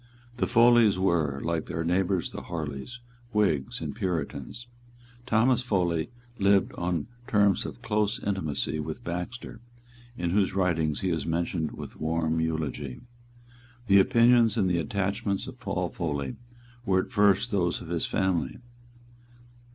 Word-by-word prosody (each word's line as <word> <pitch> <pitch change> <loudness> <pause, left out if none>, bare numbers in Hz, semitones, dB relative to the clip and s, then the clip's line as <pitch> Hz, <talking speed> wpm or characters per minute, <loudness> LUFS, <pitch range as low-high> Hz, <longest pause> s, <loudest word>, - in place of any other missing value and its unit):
The - - +1
Foleys 120 -4 +5
were, 80 -7 +1
like 85 -1 -1
their 80 - -3
neighbours 90 +1 0
the - - -6
Harleys, 80 - -6 0.3
Whigs 90 -11 +1
and - - -4
Puritans. 90 - -3 0.6
Thomas 120 +2 +3
Foley 90 -8 0 0.3
lived 100 -1 +3
on 85 -3 -2 0.2
terms 100 -2 +3
of - - -10
close 105 +2 0
intimacy 80 - -1
with 75 - -5
Baxter, 90 +7 -5 0.6
in 85 -1 -1
whose 95 0 +1
writings 80 -5 +1
he 95 - 0
is 80 -3 -2
mentioned 85 -1 -1
with - - -9
warm 80 +1 0
eulogy. 80 -5 -3 0.8
The 100 -2 +6
opinions 115 +2 +5
and 100 -4 +2
the 90 -1 +1
attachments 100 +4 -1
of 130 -1 -10
Paul 95 -6 -2
Foley 70 -7 -3 0.5
were 95 -5 +2
at - - -13
first 100 +3 +3
those 90 -4 +1
of 80 - -10
his 85 -1 -1
family. 90 -8 0
90 Hz, 135 wpm, -27 LUFS, 80-105 Hz, 0.8 s, The